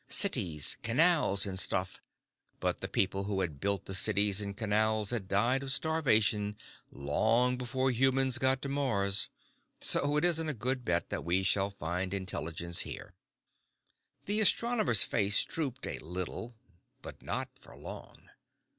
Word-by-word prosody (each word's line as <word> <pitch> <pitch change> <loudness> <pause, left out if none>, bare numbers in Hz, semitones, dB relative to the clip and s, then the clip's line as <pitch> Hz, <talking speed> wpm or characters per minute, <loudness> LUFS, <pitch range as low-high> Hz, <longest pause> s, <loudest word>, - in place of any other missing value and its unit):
Cities, 95 - +1
canals, 125 - +3
and 95 -2 -2
stuff. 95 0 0 0.6
But - - -2
the - - -3
people 95 0 -1
who 100 -1 -2
had 80 -6 -4
built 100 +1 -2
the 95 - -7
cities 100 +1 +2
and 100 -1 -6
canals 110 -1 0
had 110 -6 -3
died 115 +7 +1
of 135 -1 -5
starvation 110 -9 +1 0.3
long 110 - +1
before 130 +1 -1
humans 130 +1 +1
got 130 +1 +1
to - - -3
Mars. 105 -8 0 0.5
So 145 +1 +4
it 150 - +2
isn't 160 -2 +2
a 150 - -2
good 125 +3 -2
bet 85 -5 -1
that - - -3
we 90 +3 0
shall 100 +1 +1
find 90 +1 -4
intelligence 85 -3 -4
here." - - -3 1.1
The 205 +2 0
astronomer's 215 - +3
face 100 -1 +3
drooped 135 -5 -4
a - - -5
little. 90 +8 -6 0.5
But - - -10
not - - -4
for - - -16
long. - - -11
110 Hz, 145 wpm, -31 LUFS, 95-135 Hz, 1.1 s, So